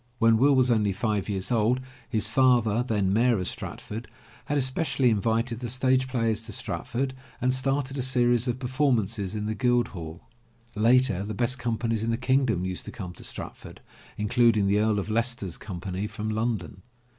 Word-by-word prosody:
When 115 -1 +4
Will 140 +4 +4
was 130 -1 +3
only 105 -4 +2
five 105 0 -1
years 95 +2 -2
old, 120 +2 +2 0.3
his 110 -4 +1
father, 120 -4 +3
then 105 -6 0
Mayor 120 +2 +3
of 90 - -2
Stratford, 110 +3 -6 0.4
had 145 - -1
especially 130 -1 +1
in 105 -2 +1
vited 115 +1 0
the 120 -1 -4
stage 130 +1 +2
players 115 -3 -1
to - - -7
Stratford 130 +5 -3 0.3
and 130 0 +1
started 135 +1 -1
a - - +1
series 120 -1 +2
of 120 0 -1
per 130 - -6
formances 115 -7 0
in 105 0 -3
the 110 - -1
Guild 120 +1 +1
Hall. 80 -3 -8 0.5
Later, 115 -2 +3
the 105 +1 -4
best 125 +4 0
companies 115 -2 -1
in 115 - -1
the 115 - +1
kingdom 130 -7 +1
used 95 -1 -4
to - - -7
come 90 -5 -7
to - - -10
Stratford, - - -7 0.4
including 110 -1 +3
the 100 +1 +3
Earl 110 -1 +2
of 100 - -2
Leices 115 +3 +1
ter's 95 -8 -5
Company 95 0 -4
from 110 0 -4
London. 110 -5 -2
115 Hz, 190 wpm, -26 LUFS, 105-125 Hz, 0.5 s, When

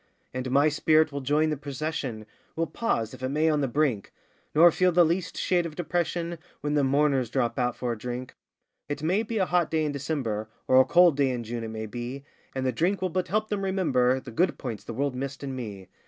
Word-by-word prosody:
And 130 0 -3
my 140 +3 +4
spirit 155 +1 +3
will 140 0 -4
join 150 +4 +2
the 150 - -1
procession 140 -5 -4 0.3
Will 165 - 0
pause, 115 - -1
if - - -11
it 130 - -1
may, 155 +3 +2
on 150 -1 +1
the 135 - +1
brink 130 -6 0 0.4
Nor 170 +3 +8
feel 185 +2 +3
the 175 0 +5
least 170 +3 -1
shade 175 -2 +1
of 155 - -10
depression 170 0 -2 0.2
When 145 0 -1
the 145 -1 +3
mourners 135 -2 +2
drop 120 +2 0
out 125 -1 0
for 125 -1 -2
a 115 - -3
drink; 125 +2 -5 0.6
It 145 +1 -4
may 185 +7 +2
be 225 0 -3
a 190 - +2
hot 175 -2 +1
day 160 -1 +1
in 150 - -1
December, 130 -7 -3 0.2
Or 130 0 +7
a - - +2
cold 175 -4 +5
day 140 -2 +3
in 125 -2 -2
June 115 +1 -5
it - - -4
may 110 0 -5
be, 120 +5 -6 0.3
And 130 0 -2
the 130 - +2
drink 175 - 0
will 185 - +1
but 180 +1 -1
help 215 +3 0
them 205 -2 -2
remember 145 -10 +2
The 130 - -10
good 175 +11 +1
points 120 -6 -5
the 115 - -7
world 140 +1 0
missed 135 +2 -5
in 135 -1 -4
me. 105 -7 -7
145 Hz, 235 wpm, -27 LUFS, 125-165 Hz, 0.6 s, Nor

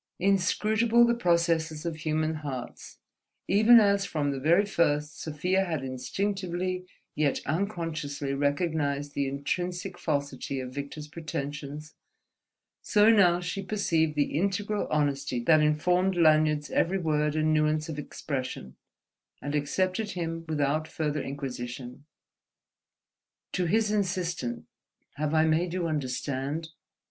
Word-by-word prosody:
Inscrutable 215 +5 +3
the 235 - +3
processes 170 -6 +1
of 165 -2 -3
human 155 0 0
hearts: 130 -5 -7 0.5
even 220 +5 +7
as 200 -2 +3
from 150 -6 -1
the 135 - -3
very 170 +8 +4
first 150 -6 0
Sofia 180 +5 0
had 160 -7 -3
instinctively 185 +6 -3 0.3
yet 150 -2 +1
unconsciously 155 -5 -2
recognized 145 0 -1
the 140 -1 0
intrinsic 175 +7 -3
falsity 140 -3 -2
of 130 0 -6
Victor's 140 +2 -6
pretensions, 150 -1 -6 0.9
so 210 +1 +5
now 180 -5 +5
she 180 +2 -4
perceived 165 -6 0
the 145 -1 0
integral 200 +2 -1
honesty 140 -4 0
that 155 +5 +5
informed 180 +5 +2
Lanyard's 155 -3 +3
every 185 +3 +2
word 150 -3 0
and 155 0 +2
nuance 155 +1 +1
of 155 -2 -5
expression, 130 - -5 0.6
and 145 - -5
accepted 185 +8 0
him 165 -2 -4
without 155 +1 0
further 150 -2 -2
inquisition. 125 -1 -6 1.5
To 180 - 0
his 215 +3 +2
insistent 180 - -2 0.5
"Have 155 +1 -1
I 155 0 +5
made 165 +2 +1
you 180 -2 -1
understand?" 145 +1 -2
155 Hz, 120 wpm, -28 LUFS, 145-180 Hz, 1.5 s, even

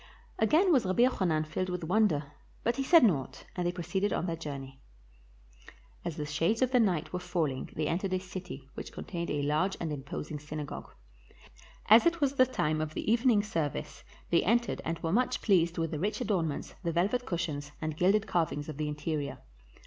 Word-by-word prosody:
Again 320 - +4
was 260 - +4
Rabbi 185 +6 +3
Jochanan 175 -11 +2
filled 185 +4 -2
with 180 -1 -3
wonder, 160 -6 +2 0.3
but 235 0 +1
he 270 - 0
said 330 +3 +7
naught, 135 - +1
and 180 -1 -1
they - - +1
proceeded 180 +3 -1
on - - 0
their 170 -2 -1
journey. 140 -4 -7 1.2
As 170 -3 -4
the 150 - -2
shades 165 - +1
of 255 0 0
night 190 -12 +2
were 180 - -1
falling 165 -7 -2
they 155 - -1
entered 185 +4 -1
a 185 - +1
city 180 -7 -8
which - - -7
contained 170 -2 -5
a 145 -1 -1
large 155 +7 +1
and 160 -3 -2
imposing 145 +2 -5
synagogue. 150 0 -6 1.0
As 225 +9 +8
it 340 0 +1
was 280 -2 +2
the 255 -2 +5
time 155 -10 0
of 155 0 -4
the - - -1
evening 230 -3 +4
service 165 -9 -3 0.3
they 170 - +5
entered 235 +4 +1
and 165 0 -2
were 165 +1 0
much 250 +4 +2
pleased 175 -4 +2
with 165 -1 -1
the 155 - -3
rich 205 +6 -1
adornments, 185 - -1
the 170 - 0
velvet 200 +9 0
cushions, 150 -4 -3
and 155 -1 -3
gilded 195 +6 +3
carvings 160 -6 -1
of 155 -3 -6
the 155 0 -1
interior. 150 -1 -3
170 Hz, 190 wpm, -30 LUFS, 150-210 Hz, 1.2 s, As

